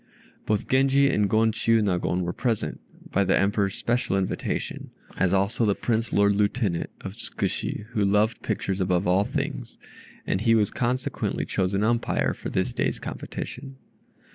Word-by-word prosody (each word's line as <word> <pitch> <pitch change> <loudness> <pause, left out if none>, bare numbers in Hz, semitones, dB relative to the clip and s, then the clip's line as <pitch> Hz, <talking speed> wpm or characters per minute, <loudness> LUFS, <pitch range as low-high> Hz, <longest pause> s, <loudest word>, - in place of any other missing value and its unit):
Both 105 -2 0
Genji 135 +1 +4
and 105 -1 +2
Gon 110 +2 +3
Chiûnagon 105 -6 +1
were 85 0 -2
present, 115 -4 -1 0.3
by 100 - +3
the 95 0 +3
Emperor's 100 -1 +1
special 120 -5 0
invitation, 95 -1 -3 0.3
as 95 - +1
also 100 +4 +1
the 105 -3 +3
Prince 115 -1 -1
Lord 100 0 +4
Lieutenant 100 -3 0
of 95 - -6
Tzkushi 115 -2 -3
who 110 -3 0
loved 105 +3 +2
pictures 100 -3 -2
above 90 0 +1
all 95 +2 +3
things, - - -4 0.5
and 95 - 0
he 115 +1 +4
was 105 -3 +2
consequently 125 +1 -1
chosen 95 +2 0
umpire 120 +2 +1
for - - -6
this - - -1
day's - - 0
competition. 135 +1 -7
105 Hz, 150 wpm, -25 LUFS, 95-115 Hz, 0.5 s, Genji